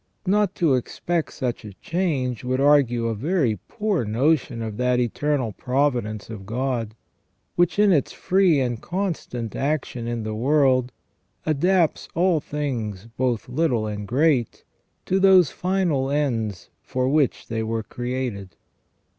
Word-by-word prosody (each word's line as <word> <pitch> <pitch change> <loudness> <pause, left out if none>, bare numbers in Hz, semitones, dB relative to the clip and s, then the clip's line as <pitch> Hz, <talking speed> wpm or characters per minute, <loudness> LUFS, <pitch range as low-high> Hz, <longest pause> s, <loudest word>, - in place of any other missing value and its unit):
Not 200 0 +2
to 165 -6 +2
expect 165 +6 -1
such 125 -5 -3
a 105 -2 -9
change 140 - -2
would 130 +1 -1
argue 135 -5 +4
a 115 - 0
very 135 - 0
poor 210 - -1
notion 125 +2 +1
of 110 -2 -5
that 125 0 +2
eternal 125 0 0
providence 125 -2 -1
of 105 -4 -9
God, 120 -2 -2 0.6
which, 175 +1 +2
in 205 -1 +5
its 145 -7 +2
free 185 -5 +3
and 120 -3 -1
constant 170 - -3
action 135 -4 -2
in 120 -1 -3
the 110 0 -3
world, 130 +1 +2 0.5
adapts 165 +2 +2
all 175 -1 +3
things 120 -10 -4
both 125 -2 -1
little 125 -4 0
and 105 -1 -5
great 135 -2 +1 0.4
to 190 - +1
those 190 -5 +6
final 175 -8 0
ends 115 -10 -1
for 130 0 -1
which 145 -1 +1
they 110 -1 -2
were 110 0 -2
created. 120 -7 -4
130 Hz, 140 wpm, -23 LUFS, 115-155 Hz, 0.6 s, those